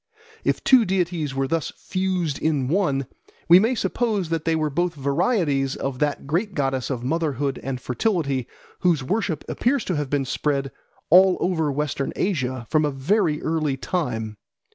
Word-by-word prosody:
If -, -, 0 dB
two 260 Hz, -3 st, +6 dB
deities 175 Hz, -7 st, -1 dB
were 135 Hz, 0 st, 0 dB
thus 165 Hz, +2 st, -1 dB
fused 185 Hz, -6 st, -2 dB
in 150 Hz, -5 st, 0 dB
one, 145 Hz, -5 st, +1 dB, 0.4 s
we 175 Hz, +2 st, +9 dB
may 225 Hz, +6 st, +2 dB
suppose 215 Hz, -7 st, -1 dB
that 165 Hz, -2 st, -2 dB
they 165 Hz, 0 st, +2 dB
were 155 Hz, -1 st, 0 dB
both 175 Hz, +3 st, 0 dB
varieties 140 Hz, -, +1 dB
of 135 Hz, -2 st, -4 dB
that 145 Hz, -2 st, -1 dB
great 175 Hz, +8 st, -1 dB
goddess 135 Hz, -3 st, -1 dB
of 125 Hz, -3 st, -3 dB
motherhood 145 Hz, -1 st, -1 dB
and 135 Hz, -2 st, -4 dB
fertility 140 Hz, -, -1 dB, 0.3 s
whose 170 Hz, -6 st, +2 dB
worship 185 Hz, 0 st, -1 dB
appears 260 Hz, +1 st, 0 dB
to 180 Hz, -, -1 dB
have 145 Hz, -2 st, -2 dB
been 140 Hz, -1 st, 0 dB
spread 140 Hz, 0 st, -1 dB, 0.4 s
all 185 Hz, +1 st, +7 dB
over 160 Hz, -5 st, 0 dB
Western 140 Hz, -1 st, -2 dB
Asia 130 Hz, -, -1 dB
from 155 Hz, -1 st, +3 dB
a 150 Hz, -, +2 dB
very 150 Hz, +3 st, 0 dB
early 155 Hz, -4 st, 0 dB
time. 115 Hz, -, -3 dB
155 Hz, 165 wpm, -23 LUFS, 135-180 Hz, 0.4 s, we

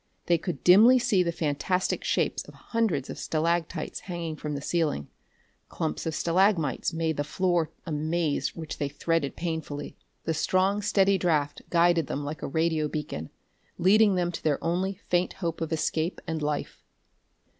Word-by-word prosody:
They 170 Hz, -1 st, +3 dB
could 175 Hz, 0 st, -5 dB
dimly 220 Hz, +8 st, +8 dB
see 240 Hz, -6 st, +2 dB
the 170 Hz, -1 st, +1 dB
fantastic 165 Hz, +4 st, -1 dB
shapes -, -, 0 dB
of -, -, -13 dB
hundreds 205 Hz, -, -1 dB
of -, -, -7 dB
stalactites 165 Hz, +1 st, -1 dB
hanging 170 Hz, -4 st, -5 dB
from 150 Hz, -1 st, -4 dB
the -, -, -3 dB
ceiling. 155 Hz, -, -1 dB, 0.6 s
Clumps 75 Hz, -, -3 dB
of 160 Hz, -, -2 dB
stalagmites 170 Hz, -, +2 dB
made 160 Hz, -2 st, -1 dB
the 145 Hz, -, 0 dB
floor 175 Hz, +1 st, 0 dB, 0.2 s
a 165 Hz, -, -5 dB
maze 155 Hz, 0 st, -1 dB
which 160 Hz, -2 st, -6 dB
they 145 Hz, -, -1 dB
threaded 145 Hz, 0 st, -1 dB
painfully. 160 Hz, -4 st, -4 dB, 0.3 s
The 160 Hz, -, 0 dB
strong 185 Hz, +5 st, +1 dB
steady 195 Hz, -2 st, +3 dB
draft 150 Hz, -5 st, 0 dB
guided 170 Hz, -3 st, +3 dB
them 145 Hz, +1 st, -3 dB
like 150 Hz, +2 st, -5 dB
a -, -, -3 dB
radio 160 Hz, +1 st, +1 dB
beacon, 145 Hz, -, -5 dB, 0.5 s
leading 200 Hz, +3 st, +5 dB
them 175 Hz, -1 st, 0 dB
to 165 Hz, -, -7 dB
their 150 Hz, -3 st, +2 dB
only 185 Hz, +4 st, 0 dB
faint 180 Hz, 0 st, +1 dB
hope 170 Hz, -3 st, -4 dB
of 165 Hz, 0 st, -2 dB
escape 160 Hz, +2 st, -1 dB
and 160 Hz, -1 st, -3 dB
life. 150 Hz, -1 st, -3 dB
165 Hz, 165 wpm, -27 LUFS, 150-180 Hz, 0.6 s, dimly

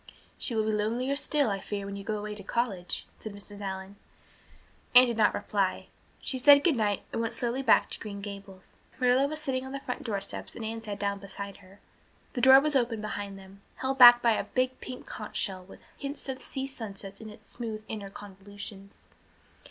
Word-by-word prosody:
"She 235 Hz, -, -1 dB
will 220 Hz, -, +2 dB
be 220 Hz, -, 0 dB
lonelier 230 Hz, +6 st, 0 dB
still, 285 Hz, -4 st, +1 dB
I 195 Hz, -, -1 dB
fear, 200 Hz, 0 st, -4 dB
when 200 Hz, 0 st, -5 dB
you 200 Hz, -, -7 dB
go 215 Hz, +1 st, -2 dB
away 210 Hz, 0 st, -5 dB
again 210 Hz, -, -6 dB
to -, -, -8 dB
college," 200 Hz, -7 st, -1 dB
said 215 Hz, -, -7 dB
Mrs. 205 Hz, 0 st, -10 dB
Allan. 190 Hz, 0 st, -5 dB, 1.0 s
Anne 250 Hz, +1 st, +11 dB
did 240 Hz, -2 st, -1 dB
not 215 Hz, -2 st, +3 dB
reply; 195 Hz, -3 st, -1 dB, 0.3 s
she 260 Hz, -, 0 dB
said 285 Hz, +2 st, +8 dB
good 320 Hz, -4 st, +4 dB
night 210 Hz, -4 st, 0 dB
and -, -, 0 dB
went 230 Hz, -, -2 dB
slowly 245 Hz, +2 st, -1 dB
back 245 Hz, -5 st, +5 dB
to -, -, -2 dB
green 205 Hz, -2 st, -6 dB
Gables. 200 Hz, -2 st, -10 dB, 0.2 s
Marilla 255 Hz, +2 st, +4 dB
was 310 Hz, +1 st, -3 dB
sitting 265 Hz, -4 st, -2 dB
on 265 Hz, 0 st, -7 dB
the 275 Hz, -, -3 dB
front 250 Hz, -2 st, -5 dB
door 210 Hz, -5 st, -1 dB
steps 195 Hz, -, -6 dB
and 225 Hz, -, -5 dB
Anne 225 Hz, +1 st, -4 dB
sat 210 Hz, -2 st, -5 dB
down 200 Hz, 0 st, -1 dB
beside 200 Hz, 0 st, -7 dB
her. 195 Hz, +1 st, -18 dB, 0.5 s
The 245 Hz, -, -2 dB
door 265 Hz, +1 st, +9 dB
was 300 Hz, +1 st, 0 dB
open 235 Hz, -4 st, +2 dB
behind 205 Hz, -2 st, -5 dB
them, 195 Hz, +1 st, -14 dB
held 265 Hz, +1 st, -2 dB
back 240 Hz, -1 st, +10 dB
by 235 Hz, -, +5 dB
a 220 Hz, -, 0 dB
big 255 Hz, 0 st, -1 dB
pink 255 Hz, -1 st, -8 dB
conch -, -, -7 dB
shell 185 Hz, -2 st, -2 dB
with 185 Hz, -, -15 dB, 0.2 s
hints 280 Hz, 0 st, -6 dB
of 265 Hz, -1 st, -4 dB
sea 265 Hz, 0 st, -3 dB
sunsets 200 Hz, -6 st, -7 dB
in 220 Hz, -, -8 dB
its 210 Hz, -, -14 dB
smooth 220 Hz, -3 st, -5 dB
inner 205 Hz, -3 st, -5 dB
convolutions. 200 Hz, 0 st, -11 dB
215 Hz, 215 wpm, -29 LUFS, 200-255 Hz, 1.0 s, Anne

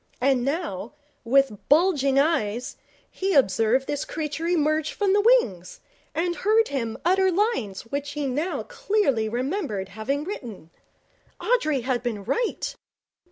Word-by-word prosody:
And 260 Hz, -1 st, +2 dB
now, 275 Hz, -, -3 dB, 0.3 s
with 255 Hz, -3 st, +2 dB
bulging 290 Hz, -4 st, +3 dB
eyes, 250 Hz, -6 st, +1 dB, 0.4 s
he 385 Hz, 0 st, -1 dB
observed 230 Hz, +1 st, +3 dB
this 290 Hz, 0 st, -2 dB
creature 310 Hz, +1 st, -4 dB
emerge 310 Hz, -2 st, +1 dB
from 400 Hz, -2 st, +1 dB
the 410 Hz, -, +4 dB
wings, 245 Hz, -, +2 dB, 0.4 s
and 345 Hz, +1 st, -1 dB
heard 440 Hz, +2 st, +3 dB
him 230 Hz, -5 st, -3 dB
utter 380 Hz, +1 st, +3 dB
lines 350 Hz, -, -1 dB
which 280 Hz, +4 st, -4 dB
he 295 Hz, -1 st, -2 dB
now 290 Hz, +7 st, -2 dB
clearly 400 Hz, -, 0 dB
remembered 245 Hz, -, -2 dB
having 220 Hz, +9 st, -2 dB
written. 235 Hz, -, -7 dB, 0.7 s
Audrey 310 Hz, -, +1 dB
had 250 Hz, 0 st, -1 dB
been 225 Hz, -5 st, -3 dB
right! 470 Hz, -, -2 dB
280 Hz, 130 wpm, -25 LUFS, 235-360 Hz, 0.7 s, the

